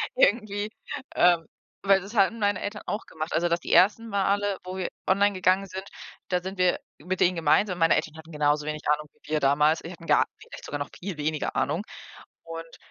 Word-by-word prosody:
irgendwie, 215 Hz, -, +2 dB, 0.4 s
ähm, 175 Hz, -2 st, +4 dB, 0.4 s
weil 195 Hz, -1 st, +4 dB
das 200 Hz, +5 st, -10 dB
hatten 220 Hz, +2 st, +3 dB
meine 205 Hz, -2 st, +1 dB
Eltern 205 Hz, +1 st, -4 dB
auch 210 Hz, -, -3 dB
gemacht. 155 Hz, +1 st, -5 dB
Also, 175 Hz, +1 st, +2 dB
die 170 Hz, 0 st, -1 dB
ersten 215 Hz, +4 st, +5 dB
Male, 200 Hz, 0 st, +1 dB
wo 185 Hz, +1 st, -6 dB
wir 185 Hz, -, -1 dB, 0.2 s
online 200 Hz, +2 st, +3 dB
gegangen 185 Hz, +1 st, +2 dB
sind, 190 Hz, +1 st, -7 dB, 0.4 s
da 180 Hz, -1 st, +1 dB
sind 190 Hz, +2 st, -6 dB
wir 180 Hz, -1 st, +3 dB, 0.2 s
mit 180 Hz, +4 st, -3 dB
denen 180 Hz, +1 st, +4 dB
gemeinsam 175 Hz, +4 st, +2 dB
meine 165 Hz, 0 st, +5 dB
Eltern 155 Hz, 0 st, -2 dB
hatten 160 Hz, +1 st, -12 dB
genauso 150 Hz, 0 st, +1 dB
wenig 150 Hz, 0 st, -4 dB
Ahnung 150 Hz, 0 st, +1 dB
wie -, -, -16 dB
wir 155 Hz, -, +3 dB
damals. 150 Hz, +3 st, +3 dB
Sie 165 Hz, -, -8 dB
hatten 170 Hz, -2 st, -12 dB
gar -, -, +5 dB
vielleicht -, -, -11 dB
sogar 145 Hz, -, -4 dB
noch 145 Hz, -, -4 dB
viel 185 Hz, -3 st, -5 dB
weniger 150 Hz, 0 st, -2 dB
Ahnung 160 Hz, +7 st, 0 dB, 0.6 s
und 165 Hz, 0 st, -8 dB
180 Hz, 200 wpm, -26 LUFS, 155-200 Hz, 0.6 s, ersten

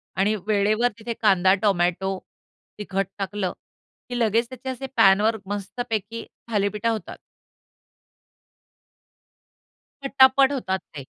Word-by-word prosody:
आणि 200 Hz, +3 st, +2 dB
वेळेवर 215 Hz, +3 st, +2 dB
तिथे 230 Hz, +1 st, -4 dB
कांदा, 190 Hz, -3 st, +4 dB
टोमॅटो, 190 Hz, -1 st, +1 dB, 0.6 s
तिखट 195 Hz, -2 st, -2 dB
टाकलं, 195 Hz, -1 st, -3 dB, 0.6 s
की 245 Hz, 0 st, -3 dB
लगेच 230 Hz, +1 st, +1 dB
त्याचे 260 Hz, +1 st, -7 dB
असे 260 Hz, +1 st, -5 dB
पॅनवर 205 Hz, +4 st, +5 dB
मस्तपैकी 220 Hz, +2 st, -4 dB, 0.3 s
थालीपीठं 210 Hz, +1 st, 0 dB
होतात. 220 Hz, -2 st, -4 dB, 2.8 s
पटापट 270 Hz, 0 st, +5 dB
होतात 190 Hz, -9 st, -2 dB, 0.2 s
ते. 140 Hz, -, -6 dB
210 Hz, 95 wpm, -24 LUFS, 195-235 Hz, 2.8 s, पॅनवर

